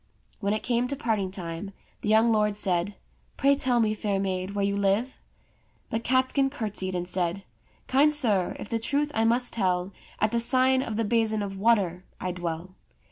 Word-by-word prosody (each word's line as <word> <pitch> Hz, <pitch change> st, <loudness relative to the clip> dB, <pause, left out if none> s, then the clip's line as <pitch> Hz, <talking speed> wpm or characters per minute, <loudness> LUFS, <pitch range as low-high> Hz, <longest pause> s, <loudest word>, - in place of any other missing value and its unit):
When 200 Hz, 0 st, 0 dB
it 215 Hz, -, -2 dB
came 245 Hz, 0 st, +1 dB
to 280 Hz, -, -3 dB
parting 220 Hz, -8 st, -1 dB
time, 185 Hz, +1 st, -6 dB, 0.3 s
the -, -, -2 dB
young 220 Hz, +2 st, +5 dB
lord 210 Hz, -2 st, +1 dB
said, 185 Hz, 0 st, 0 dB, 0.2 s
" -, -, -37 dB
Pray 280 Hz, 0 st, +4 dB
tell 255 Hz, -3 st, +3 dB
me, 215 Hz, -2 st, +2 dB
fair 205 Hz, -2 st, -1 dB
maid, 190 Hz, 0 st, -3 dB
where 200 Hz, -1 st, +1 dB
you 200 Hz, 0 st, 0 dB
live 200 Hz, +6 st, 0 dB, 0.3 s
?" -, -, -39 dB
But 225 Hz, +1 st, -2 dB
Catskin 260 Hz, +2 st, +2 dB
curtsied 210 Hz, -8 st, -4 dB
and 175 Hz, 0 st, -3 dB
said: 180 Hz, +1 st, -1 dB, 0.4 s
"Kind 285 Hz, +3 st, +4 dB
sir, 220 Hz, -11 st, +2 dB
if -, -, -7 dB
the 230 Hz, -, -1 dB
truth 290 Hz, +5 st, 0 dB
I 225 Hz, -, +1 dB
must 245 Hz, +2 st, +2 dB
tell, 185 Hz, -3 st, 0 dB, 0.3 s
At 215 Hz, 0 st, +2 dB
the 235 Hz, -, +1 dB
sign 260 Hz, +2 st, +2 dB
of 220 Hz, -5 st, -4 dB
the 225 Hz, -, 0 dB
'Basin 220 Hz, -1 st, +1 dB
of 195 Hz, -1 st, -5 dB
Water' 195 Hz, -4 st, +1 dB, 0.2 s
I 185 Hz, -, -2 dB
dwell." 175 Hz, 0 st, -5 dB
210 Hz, 195 wpm, -26 LUFS, 190-240 Hz, 0.4 s, young